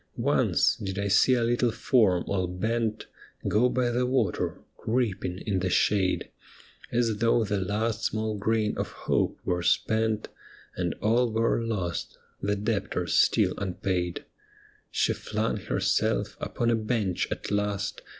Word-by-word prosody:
Once - - +2
did 95 -2 -5
I 100 0 -1
see 125 +6 +5
a 120 - +1
little 120 +1 +2
form 110 -6 +2
all 95 -2 -1
bent 110 +4 -2 0.4
Go 120 +4 +3
by 125 -1 +1
the 125 +1 +1
water, 125 -8 0 0.2
creeping 110 -6 -1
in 100 -4 0
the 90 0 -1
shade. 95 0 +1 0.6
As 115 -3 +1
though 115 +1 +3
the 105 -1 -1
last 105 +4 -1
small 110 0 -1
grain 105 +1 0
of - - -3
hope - - +1
were 90 -1 0
spent, 110 +4 +1 0.5
And 85 -2 -2
all 115 +2 +3
were 115 +1 +1
lost, 95 -7 -3 0.2
the 100 +1 0
debtor 100 -3 -1
still - - +3
unpaid. 90 -2 -2 0.6
She - - +1
flung - - -2
herself - - 0
upon 120 0 0
a - - +3
bench 110 -5 -1
at - - -5
last. 105 0 -1
105 Hz, 140 wpm, -27 LUFS, 95-115 Hz, 0.6 s, see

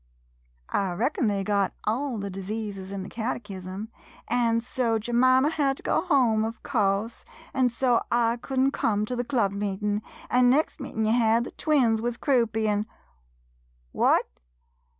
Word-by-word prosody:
I 195 -3 0
reckon 240 - 0
they 200 -2 0
got 200 -1 0
all 245 +3 -1
the 200 -1 -4
diseases 195 0 -5
in 195 -1 -4
the - - -8
catechism, 205 -3 -5 0.4
an' 235 -1 +2
so 235 -1 0
Jemima 255 +5 +3
had 275 -4 0
to - - -11
go - - +1
home 255 -11 +3
of 225 +1 -5
course, 210 -1 0 0.3
an' 260 -2 +3
so 240 0 +2
I 235 0 +2
could 265 +2 -6
n't 270 +1 +3
come 210 -1 0
to 250 - -3
the 245 - -1
club 235 -6 +1
meetin', 205 +1 -2 0.3
an' 250 0 +4
next 300 +6 +1
meetin' 225 -5 -3
ye 215 - +2
had, 230 0 +3
the - - -7
twins 250 -8 +2
wuz 240 +1 -1
croupy, 230 -6 +1
an' 210 +1 0 0.5
— - - -39
what - - +4
225 Hz, 165 wpm, -26 LUFS, 205-250 Hz, 0.5 s, an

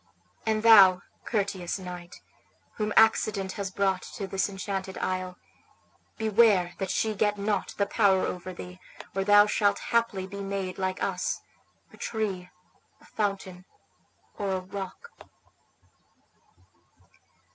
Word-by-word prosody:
And 215 0 +1
thou, 195 -5 +8 0.2
courteous 195 -5 -2
knight, 180 -1 -9 0.6
whom 210 -1 -1
accident 215 -3 +3
has 200 -1 -4
brought 190 -1 0
to 205 - -4
this 195 +1 -1
enchanted 195 -1 -5
isle, 185 -1 -3 0.8
beware 210 -5 +3
that 195 - -2
she 220 +3 0
get 210 0 +1
not 200 -1 -2
the 200 - +2
power 200 -2 +3
over 180 +1 -5
thee, 180 0 -10 0.4
or 195 - +1
thou 205 +1 +7
shalt 205 -1 +2 0.2
haply 230 -5 +1
be 200 +1 -7
made 195 -1 -4
like 185 0 -2
us, 180 -2 -2 0.5
a - - -14
tree, 195 -5 -3 0.5
a - - -21
fountain, 195 -3 -3 0.7
or 200 -2 -1
a 190 - 0
rock." 195 - -8
195 Hz, 125 wpm, -27 LUFS, 185-210 Hz, 0.8 s, thou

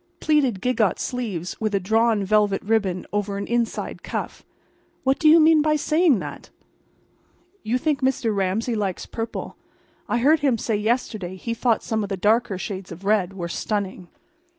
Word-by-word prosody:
"—plaited 270 -11 +1
gigot 230 -6 +1
sleeves 210 -10 -4
with 215 -2 0
a - - +2
drawn 220 +2 +2
velvet 205 0 +2
ribbon 200 -4 0
over 205 -1 -1
an 200 - -3
inside 235 -1 -2
cuff. - - -5 0.6
What 270 +1 +2
do 310 - +5
you 325 +2 +8
mean 315 0 +6
by 305 0 +2
saying 305 -1 +3
that?" - - -7 1.1
"You 230 +4 0
think 295 +1 -1
Mr. 255 -4 +1
Ramsay 200 +5 0
likes 200 -4 -2
purple. 225 0 -6 0.5
I - - +1
heard 295 +6 +4
him 275 -5 +2
say 220 0 -1
yesterday 210 -4 -1
he 230 +5 -4
thought 230 0 +1
some 220 -1 -1
of 200 - -4
the 195 - -2
dark 215 +5 +2
shades 190 -2 -6
of 175 +4 -10
red 200 -3 +2
were 175 -3 -4
stunning." 190 0 -3
220 Hz, 170 wpm, -23 LUFS, 195-250 Hz, 1.1 s, you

